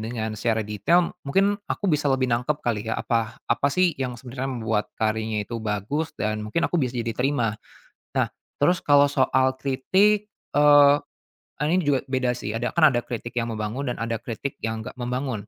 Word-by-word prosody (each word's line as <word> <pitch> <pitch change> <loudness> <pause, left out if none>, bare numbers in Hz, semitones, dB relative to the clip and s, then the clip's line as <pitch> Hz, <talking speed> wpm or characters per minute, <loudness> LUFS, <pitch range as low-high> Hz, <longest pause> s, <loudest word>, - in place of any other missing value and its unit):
dengan 110 -1 -4
secara 110 0 0
detail 105 - +2
mungkin 195 +8 +2
aku 200 - -2
bisa 150 -1 +1
lebih 130 -1 +1
nangkep 125 +5 0
kali 110 -2 -1
ya - - 0
apa, 115 -1 -1
apa 140 - +1
sih 180 0 +3
yang 125 -2 -2
sebenarnya 130 +1 -5
membuat 110 -3 -2
karyanya 110 -1 0
itu 120 - -4
bagus 110 +11 -2
dan 110 0 -2
mungkin 165 +11 0
aku 175 - 0
bisa 125 -2 -1
jadi 115 -1 -2
terima. 125 -5 0 0.6
Nah, - - +3 0.3
terus 175 +5 +2
kalau 145 -1 +5
soal 130 -1 +2
kritik, 195 +10 +2 0.3
eee, 145 -1 +7 0.7
ini 155 +4 +2
juga 140 -4 +1
beda 130 -2 +1
sih 105 - -4
ada 120 +2 -1
kan 165 -2 +6
ada 120 - +2
kritik 120 0 -5
yang 115 0 -2
membangun 110 +6 -3
dan - - -3
ada 115 -1 -2
kritik 125 +4 -5
yang 110 0 -3
nggak 125 - -7
membangun. 125 -3 -3
125 Hz, 180 wpm, -24 LUFS, 110-145 Hz, 0.7 s, eee